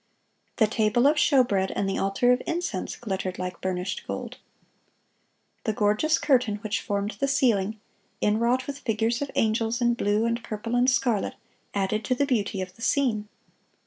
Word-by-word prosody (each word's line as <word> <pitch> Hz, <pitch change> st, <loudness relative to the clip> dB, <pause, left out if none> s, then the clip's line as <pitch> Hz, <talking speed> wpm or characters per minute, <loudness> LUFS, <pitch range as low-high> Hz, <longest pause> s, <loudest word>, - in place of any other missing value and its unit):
The 220 Hz, -, +4 dB
table 220 Hz, +3 st, +2 dB
of 295 Hz, +2 st, +5 dB
showbread 240 Hz, -, +3 dB
and 200 Hz, -, 0 dB
the 195 Hz, -, -1 dB
altar 195 Hz, +6 st, +2 dB
of 250 Hz, -, +2 dB
incense 330 Hz, -, -2 dB
glittered 190 Hz, -4 st, -4 dB
like 180 Hz, 0 st, -5 dB
burnished 185 Hz, 0 st, -3 dB
gold. -, -, -5 dB, 1.3 s
The 220 Hz, -, +1 dB
gorgeous 215 Hz, +10 st, +2 dB
curtain 250 Hz, -7 st, +2 dB
which 215 Hz, 0 st, -1 dB
formed 205 Hz, +1 st, -2 dB
the 275 Hz, -, +1 dB
ceiling, 220 Hz, -6 st, +1 dB, 0.4 s
inwrought 235 Hz, +5 st, +2 dB
with 285 Hz, 0 st, -6 dB
figures 225 Hz, 0 st, 0 dB
of 285 Hz, -, -2 dB
angels 225 Hz, +2 st, +1 dB
in 240 Hz, -1 st, +3 dB
blue 210 Hz, -1 st, +1 dB
and 235 Hz, 0 st, -1 dB
purple 225 Hz, +2 st, -5 dB
and 245 Hz, +1 st, +4 dB
scarlet, 240 Hz, -4 st, +1 dB, 0.4 s
added 200 Hz, +2 st, 0 dB
to 255 Hz, -, +1 dB
the 285 Hz, -, +1 dB
beauty 215 Hz, -7 st, -1 dB
of 185 Hz, 0 st, -6 dB
the -, -, -17 dB
scene. 230 Hz, -5 st, +1 dB
225 Hz, 165 wpm, -26 LUFS, 205-250 Hz, 1.3 s, of